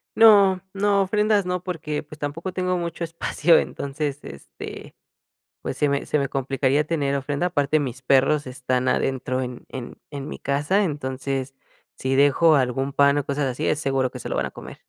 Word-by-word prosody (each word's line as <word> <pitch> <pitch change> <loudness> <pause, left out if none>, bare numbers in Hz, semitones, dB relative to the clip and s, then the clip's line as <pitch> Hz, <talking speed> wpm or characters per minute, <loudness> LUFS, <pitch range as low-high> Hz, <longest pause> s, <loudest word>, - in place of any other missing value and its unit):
No, 200 -4 +6
no, 200 0 +2
ofrendas 210 +1 +2
no, 180 0 -2
porque, 160 -5 -3
pues, 150 0 -13
tampoco 155 +6 -4
tengo 185 0 -1
mucho 170 -1 -4
espacio, 165 0 +2
entonces, 140 0 -3
este, 70 - -10 0.7
pues, - - -4
se 145 0 +2
me 140 0 -1
se 150 - +1
me 140 -1 -1
complicaría 135 +1 +1
tener 145 -3 0
ofrenda. 140 +5 -1
Aparte 155 -3 +1
mis 130 -2 -4
perros 135 +3 +3
están 130 0 -2
adentro 130 -1 0
en 125 -1 -6
en 125 -2 -7
en 140 -1 -6
mi - - -6
casa, 145 +9 +1
entonces, 135 -4 -3 0.4
si 130 0 -1
dejo 145 +3 +5
algún 135 +1 0
pan 140 0 +4
o 145 - 0
cosas 140 0 -1
así, 130 -2 -2
es 150 - +1
seguro 135 -3 0
que - - -8
se - - -6
lo - - -2
van - - 0
a - - -6
comer. - - -10
145 Hz, 185 wpm, -23 LUFS, 135-165 Hz, 0.7 s, No